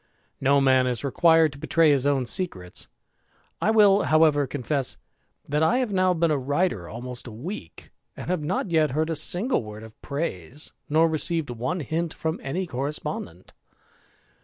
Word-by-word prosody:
No 140 +1 +3
man 130 -2 +3
is 125 +1 -2
required 160 +2 +4
to 135 - -12
betraj 165 +1 +3
his 140 -1 +2
own 135 -3 +1
secrets. 100 - -3 0.7
I - - +2
will, 210 -2 +5
however, 155 -2 +3
confess, 140 0 -2 0.5
that 150 +2 0
I 230 +11 +3
havi 215 - -9
now 185 -2 +2
been 165 -1 +1
a 145 - +1
writer 140 - -1
almost 125 +2 -7
a - - -8
week, 115 - -8 0.3
and - - -7
have 180 -2 -1
not 175 +7 -2
y^^j 160 -2 +3
heard 155 +5 -1
a - - -1
single 180 - +2
word 105 0 -9
of 110 -1 -14
praise, 140 - -5 0.2
nor 160 +2 +4
received 160 -2 0
one 125 +10 -3
hint 160 +3 -3
fro^::^, 160 +1 -3
any 175 +8 -3
correspondent. 135 - -5
150 Hz, 165 wpm, -25 LUFS, 130-165 Hz, 0.7 s, will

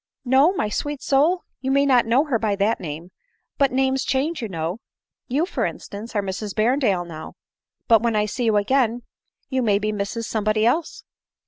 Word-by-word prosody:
" - - -53
No, 285 +6 +6
my 215 - -1
sweet 290 +6 -3
soul? 310 +7 +2 0.2
You 260 +1 -3
may 280 +1 +3
not 250 -4 +4
know 245 +5 +4
her 275 -7 -1
by 215 -2 0
that 205 +3 +1
name; 165 +2 -7 0.5
but 275 -2 +3
names 265 0 +1
change, 285 +3 -1
you 225 - -4
know. 170 +3 -3 0.5
You, 280 +6 +1
for 375 - -3
instance, 220 +3 -6
are 205 - +1
Mrs 195 +1 -5
Berrendale 215 -5 +1
now, 160 -2 -9 0.5
but 225 -3 +5
when 230 -1 0
I 210 0 +2
see 240 +4 -3
you 220 -2 +3
again 240 +2 +1 0.5
you 260 -1 0
may 210 -4 +3
be 210 +1 -1
Mrs 205 +3 -3
somebody 215 0 0
else." 305 +7 0
230 Hz, 195 wpm, -22 LUFS, 205-270 Hz, 0.5 s, No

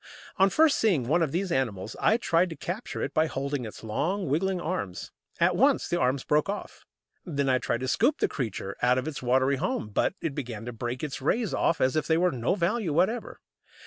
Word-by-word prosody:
On 195 +1 +5
first 310 +6 +4
seeing 185 - +2
one 170 +6 +2
of 160 -4 +1
these 185 +3 -1
animals 110 - -1
I 220 - +4
tried 180 -6 +2
to 165 - -6
capture 190 +9 -5
it - - -3
by 160 +1 +3
holding 140 -2 -3
its 110 - -9
long, 170 - -1
wriggling 180 +6 0
arms. 155 - -4 0.3
At - - +3
once - - +3
the 175 - 0
arms 130 +1 +1
broke 150 +4 +1
off. 205 - -6 0.4
Then 140 -6 -2
I 130 -1 +3
tried 120 - -2
to 130 - -2
scoop 285 - +2
the - - +1
creature 105 -6 -4
out 125 +1 +4
of 130 +3 -2
its 155 - -5
watery 130 +2 +2
home. 110 - -2
But 105 - 0
it 160 - -3
began 120 -6 -5
to 120 - -5
break 120 +3 -4
its 150 -4 -4
"rays" 215 - 0
off 165 - +1
as 130 +2 +2
if 155 - 0
they 160 - +3
were 180 +2 +3
of - - -5
no 125 +7 0
value 185 0 0
whatever. 190 +10 0
150 Hz, 225 wpm, -27 LUFS, 125-180 Hz, 0.4 s, On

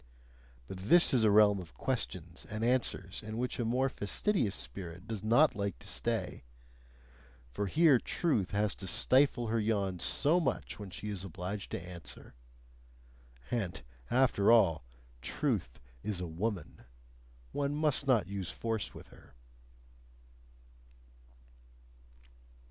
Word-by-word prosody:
But 95 0 -7
this 175 -2 +6
is 120 -4 +4
a 110 - +5
realm 105 -1 +5
of 85 -3 -11
questions 90 -10 -3
and 110 0 -3
answers 115 -6 0
in 110 0 -6
which 125 +1 -2
a - - +1
more 125 +4 +2
fastidious 125 - 0
spirit 90 0 -4
does 110 -3 -5
not 120 +7 +4
like 100 -2 -2
to - - -13
stay: - - -3 1.1
for 100 +11 -2
here 155 - +5
truth 115 - 0
has 105 +1 0
to 95 - -7
stifle 130 +2 +3
her 115 +1 +1
yawns 100 -5 0
so 155 +5 +3
much 160 - -2
when 100 -2 -7
she 105 +3 -6
is 100 -3 -4
obliged 95 +2 -5
to - - -1
answer. 90 -2 -10 1.2
And 100 -7 -2 0.3
after 120 -5 +4
all, 95 - +4 0.4
truth - - -2 0.2
is 105 -4 -3
a 90 - -3
woman; 90 +4 -4 0.7
one 145 0 -1
must 150 -2 0
not 125 -6 +4
use 95 -2 -5
force 110 - -3
with - - -12
her. - - -18
105 Hz, 130 wpm, -32 LUFS, 95-125 Hz, 1.2 s, this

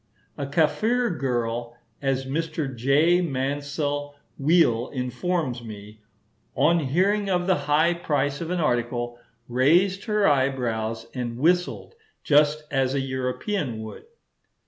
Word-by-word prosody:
A 140 -2 -4
Kafir 215 - +1
girl, 120 -5 -2 0.2
as 135 -1 0
Mr. 155 -1 -3
J. 150 +9 +3
Mansel 145 0 -2 0.2
Weale 135 -6 +3
informs 130 0 -2
me, 105 -1 -10 0.5
"on 160 +6 +3
hearing 190 +8 +1
of 180 -1 +1
the 185 -5 0
high 160 +4 +4
price 145 -4 -1
of 165 - -4
an 180 0 -1
article, 120 -4 -1 0.3
raised 170 +11 +3
her 210 -3 +2
eyebrows 120 -5 0
and 120 -2 -4
whistled 175 - +1 0.3
just 150 +1 +3
as 135 -1 +1
a - - +1
European 130 - -2
would." 110 - -9
140 Hz, 120 wpm, -25 LUFS, 125-170 Hz, 0.5 s, high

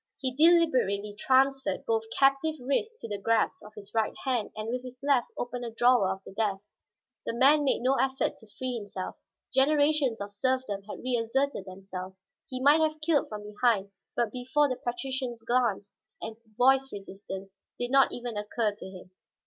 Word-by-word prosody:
He 260 -2 -2
deliberately 260 - +3
transferred 265 +4 +2
both 455 -1 0
captive 275 +3 +3
wrists 280 - -1
to - - -5
the 205 -2 -4
grasp 225 +2 +1
of 215 +1 -13
his 205 -1 -11
right 220 -2 0
hand 250 -5 0
and 215 0 -5
with 250 +1 -2
his 255 0 -10
left 275 -4 +3
opened 245 0 -4
a 235 - -3
drawer 240 -3 +4
of 190 0 -4
the - - -11
desk. 205 -1 -2 0.5
The - - -1
man 285 +5 +5
made 270 - +1
no 260 +2 +4
effort 265 0 0
to 220 - -17
free 255 +4 -4
himself. 200 -3 -6 0.4
Generations 285 -2 +3
of 200 0 -6
serfdom 255 -2 -1
had - - -7
reasserted 245 -1 0
themselves; 190 0 -8 0.3
he 255 - -4
might 290 +4 +5
have 310 0 +1
killed 310 -2 +1
from 210 -1 -6
behind, 210 -1 +1 0.2
but 235 -3 0
before 260 +4 +1
the 255 - -2
patrician's 245 -1 -4
glance 230 -4 0 0.3
and 225 0 -6 0.2
voice 265 +2 +4
resistance 195 -1 -8 0.3
did 245 0 -3
not 270 0 +5
even 240 -2 -5
occur 210 +1 -1
to 205 - -11
him. 185 -1 -12
245 Hz, 175 wpm, -28 LUFS, 210-270 Hz, 0.5 s, man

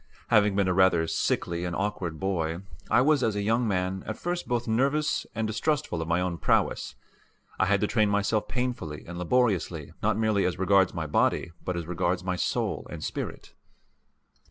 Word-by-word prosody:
Having 105 -2 +4
been 100 -1 +2
a 90 - +2
rather 90 -3 +4
sickly 85 +1 -1
and 90 -1 -3
awkward 95 -6 -3
boy, 85 -3 -1 0.3
I - - +5
was 145 +1 +3
as 110 -4 +1
a 100 - -1
young 115 +3 +1
man 95 -1 -1
at 110 - -4
first 175 0 -3
both 120 -1 -1
nervous 140 +7 +1
and 110 0 -1
distrustful 110 - -1
of 80 - -4
my 85 +2 +2
own 90 -2 -2
prowess. - - +1 0.6
I - - +3
had 100 0 +2
to - - +3
train 110 -2 +2
myself 105 +1 +1
painfully 120 - -3
and 85 0 -7
laboriously 90 - 0
not 110 0 +1
merely 110 -3 +2
as 90 -1 -1
regards 95 -1 +3
my 80 -2 -2
body 80 +3 +1
but 90 -1 -2
as 85 - -4
regards 90 +2 -1
my 90 0 -1
soul 90 - -1
and - - -7
spirit. - - -5
95 Hz, 185 wpm, -27 LUFS, 85-110 Hz, 0.6 s, I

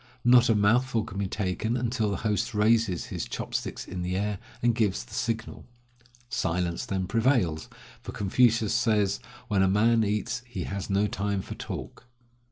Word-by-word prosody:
Not 120 0 +6
a 115 - +4
mouthful 115 +3 +2
can 100 -3 -7
be 100 - 0
taken 105 +5 -1
until 120 -3 0
the 100 - -1
host 105 0 0
raises 105 -3 +2
his - - -3
chop - - -6
sticks - - -3
in 90 -1 -5
the 90 +1 -2
air, 105 0 -1 0.2
and 120 -1 +4
gives 105 - 0
the - - -16
signal. 115 -1 -3 0.6
Silence 90 -6 -1
then 95 -1 -1
prevails; 115 - +1 0.3
for - - -7
Confucius 115 +2 +2
says: 105 -4 +2 0.3
"When 100 -3 +2
a 95 - +4
man 110 +4 +3
eats 105 +3 -1
he 95 -7 -5
has 100 -1 -5
no 100 +1 +2
time 100 -1 -2
for - - -7
talk." 125 - -7
105 Hz, 175 wpm, -27 LUFS, 95-115 Hz, 0.6 s, Not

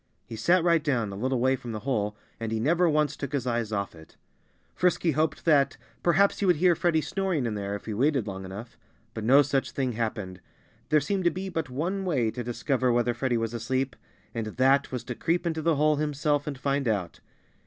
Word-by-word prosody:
He 115 - -8
sat 170 +11 +3
right 170 -3 +3
down, 120 -9 0
a - - -6
little 130 +5 -1
way 130 +2 +3
from 120 -2 -7
the 110 - -5
hole, 105 -5 -1 0.2
and 115 -1 -3
he 110 - 0
never 170 +8 +3
once 150 -1 +1
took 140 +1 -6
his 135 -3 -1
eyes 120 -3 -1
off 100 -1 -2
it. 80 -1 -16 0.6
Frisky 180 -2 +2
hoped 155 +2 -1
that 140 -4 +3 0.2
perhaps 185 +4 +3
he 205 - 0
would 180 - +5
hear 175 +3 +4
Freddie 170 -2 +1
snoring 185 -6 -1
in 115 - -1
there, 100 -1 -3
if 100 - -8
he 110 - -4
waited 135 +1 +1
long 95 -2 -6
enough. 100 +5 -9 0.3
But 110 - -5
no 135 +5 +7
such 135 -1 0
thing 130 -2 -1
happened. 110 -5 -4 0.5
There 150 -1 +4
seemed 190 +5 -1
to - - +6
be 185 +3 -5
but 160 -6 -3
one 175 +10 -2
way 130 -12 +1
to 120 +1 -5
discover 125 +1 0
whether 120 0 +2
Freddie 120 0 0
was 115 0 -2
asleep, 130 +2 -1 0.4
and 115 -2 -3
that 135 +5 +2
was 125 -3 -4
to 125 - -5
creep 170 +8 -1
into 160 -2 -1
the 165 0 +2
hole 150 +1 +3
himself 150 -1 0
and 145 -2 -3
find 140 0 -1
out. 100 -6 -1
135 Hz, 220 wpm, -27 LUFS, 115-155 Hz, 0.6 s, no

